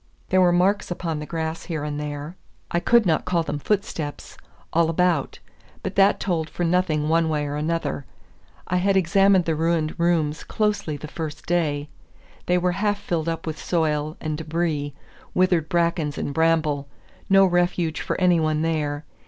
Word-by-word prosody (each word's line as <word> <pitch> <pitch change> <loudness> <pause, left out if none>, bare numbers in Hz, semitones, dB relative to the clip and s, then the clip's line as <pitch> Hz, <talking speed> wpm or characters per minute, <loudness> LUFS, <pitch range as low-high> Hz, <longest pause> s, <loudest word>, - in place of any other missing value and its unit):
There 185 0 +4
were 180 -1 +5
marks 185 +4 +2
upon 170 -3 -3
the 150 - -6
grass 160 0 -3
here 160 -4 -3
and 150 0 -3
there 150 +2 -5 0.4
I 170 - +2
could 235 +5 +4
not 160 -3 +2
call 175 -2 0
them 145 -2 -3
footsteps 170 -6 -3 0.4
all 165 0 +3
about; 165 -3 +1 0.5
but 190 - -3
that 195 +1 +4
told 165 -5 -1
for 175 - -3
nothing 165 -3 +1
one 165 0 +2
way 150 -1 0
or 145 0 -3
another. 155 -3 -2 0.6
I 180 - 0
had 195 +2 +2
examined 190 0 +4
the 165 - +1
ruined 160 0 0
rooms 160 -3 +1
closely 210 -8 -1
the 150 - -8
first 155 -1 -6
day. 150 -4 0 0.6
They 180 - +3
were 180 0 +1
half 205 +3 0
filled 165 -4 -2
up 165 - -4
with 160 -1 -5
soil 155 -2 0
and 155 -1 -3
debris, 155 -3 -2 0.4
withered 180 -4 +2
brackens 170 -4 0
and 140 - -3
bramble, 155 -3 +1 0.4
no 195 0 +7
refuge 175 -3 +1
for - - -2
any 180 -2 +4
one 155 0 +1
there. 150 -2 -1
165 Hz, 170 wpm, -23 LUFS, 150-180 Hz, 0.6 s, no